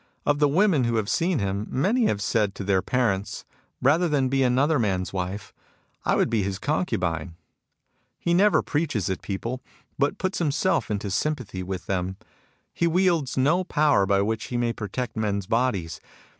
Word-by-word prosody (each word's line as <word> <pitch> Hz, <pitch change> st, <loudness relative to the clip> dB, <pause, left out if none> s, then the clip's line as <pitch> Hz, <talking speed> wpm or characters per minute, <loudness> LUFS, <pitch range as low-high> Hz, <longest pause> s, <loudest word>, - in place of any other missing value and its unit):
Of 145 Hz, 0 st, +2 dB
the 150 Hz, -, +5 dB
women 160 Hz, -, +3 dB
who 120 Hz, 0 st, 0 dB
have 110 Hz, -2 st, 0 dB
seen 170 Hz, 0 st, +1 dB
him, 100 Hz, -1 st, -2 dB
many 220 Hz, -, +1 dB
have 100 Hz, -1 st, -1 dB
said 105 Hz, -1 st, +1 dB
to -, -, -5 dB
their 95 Hz, -1 st, +2 dB
parents, 105 Hz, -6 st, -1 dB, 0.4 s
Rather 165 Hz, +6 st, +4 dB
than 135 Hz, -3 st, +1 dB
be 135 Hz, +1 st, +1 dB
another 135 Hz, +4 st, +3 dB
man's 95 Hz, -5 st, -1 dB
wife, 95 Hz, +2 st, -4 dB, 0.5 s
I -, -, +3 dB
would -, -, +2 dB
be 115 Hz, -2 st, 0 dB
his 95 Hz, 0 st, -2 dB
concubine. 90 Hz, -, -2 dB, 0.4 s
" -, -, -52 dB, 0.3 s
He 170 Hz, -, 0 dB
never 200 Hz, +4 st, +4 dB
preaches 145 Hz, -, -1 dB
at 95 Hz, -, -3 dB
people, 115 Hz, +6 st, -4 dB, 0.4 s
but 145 Hz, +8 st, +1 dB
puts 185 Hz, -1 st, -2 dB
him 155 Hz, -4 st, +1 dB
self 145 Hz, -6 st, 0 dB
into 100 Hz, -1 st, -2 dB
sympathy 125 Hz, -5 st, -2 dB
with 95 Hz, 0 st, -5 dB
them. 95 Hz, 0 st, -2 dB, 0.6 s
He 170 Hz, -, +1 dB
wields 170 Hz, -6 st, +1 dB
no 155 Hz, +8 st, +3 dB
power 150 Hz, -, +2 dB
by 100 Hz, 0 st, +3 dB
which 110 Hz, +1 st, -2 dB
he 120 Hz, -, -3 dB
may 120 Hz, -1 st, 0 dB
protect 115 Hz, +3 st, -4 dB
men's 100 Hz, -3 st, -1 dB
bodies. 100 Hz, -9 st, -1 dB
120 Hz, 180 wpm, -25 LUFS, 100-150 Hz, 0.6 s, the